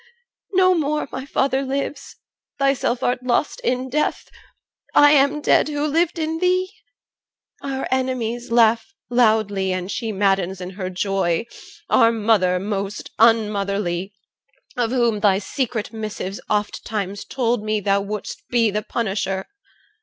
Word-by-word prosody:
No 370 0 +5
more 305 -3 -1
My 260 +1 -6
father 270 -2 +1
lives, 275 +1 -4 0.4
thyself 275 -3 +1
art 250 0 0
lost 250 +3 0
in 255 +1 -1
death, 300 +4 -1 0.7
I 290 0 +7
am 285 +1 +3
dead, - - +3
who 290 0 -1
lived 330 +3 +1
in 320 0 -2
thee. 370 +1 +1 0.9
Our 270 -1 -3
enemies 250 -2 -1
Laugh 230 - +3 0.2
loudly, 215 -5 +2
and 185 +1 -3
she 225 -2 -3
maddens 195 -2 +1
in 180 0 -6
her 185 -1 -5
joy, 185 0 0 0.4
Our 230 - +5
mother 205 -5 +2
most 200 +1 -4
unmotherly, 200 -4 +2 0.6
of 240 -2 0
whom 235 -4 +1
Thy 200 -2 +4
secret 225 +1 -3
missives 215 -3 -5
ofttimes 205 -1 -2
told 240 -4 -1
me, 215 0 0
thou 200 0 +1
Wouldst 205 +1 -5
be 230 -3 +2
the 210 +1 -1
punisher. 195 -4 -2
225 Hz, 130 wpm, -21 LUFS, 200-265 Hz, 0.9 s, I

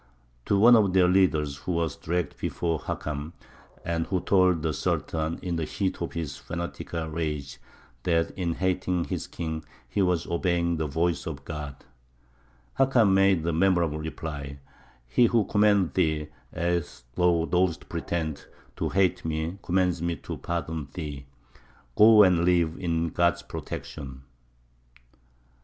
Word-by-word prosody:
To 100 - +3
one 120 +4 +8
of 100 -5 +3
their 90 -1 +5
leaders, 80 -6 +2
who 70 +6 -4
was 85 -3 -1
dragged 85 -1 -3
before 85 -2 -1
Hakam, 75 +1 -5 0.5
and 85 -1 -1
who 95 - 0
told 90 -4 +3
the 80 -2 0
Sultan, 80 +2 -1
in 90 -2 -2
the 80 - -1
heat 95 +1 -2
of 85 - -3
his 80 -5 -4
fanatical 85 -1 -5
rage, 75 -4 -4 0.4
that 85 +3 +1
in 85 -3 -2
hating 90 -1 0
his - - -4
king 80 -2 -5 0.2
he - - -1
was 90 -3 +1
obeying 85 -1 0
the 80 -1 -1
voice 85 +4 -1
of 70 -3 -6
God, 75 -4 -7 0.9
Hakam 125 -7 +4
made 95 -3 +4
the 85 0 0
memorable 85 -3 +2
reply: 75 -3 -6 0.5
"He 115 - +4
who 115 -4 +2
commanded 105 -4 +3
thee, 80 -4 +1 0.2
as 85 -6 -2
thou 85 +1 +2
dost 90 -1 0
pretend, 80 -4 -3 0.3
to - - -1
hate 95 -2 +1
me, 80 +4 -3
commands 90 -2 +1
me 85 0 -1
to - - -7
pardon 80 -3 -3
thee. 75 -5 -6 0.7
Go 110 0 +8
and 90 -3 +4
live, 85 -2 +2
in 85 -2 0
God's 85 +1 +1
protection!" 65 -3 -7
85 Hz, 145 wpm, -27 LUFS, 80-90 Hz, 0.9 s, one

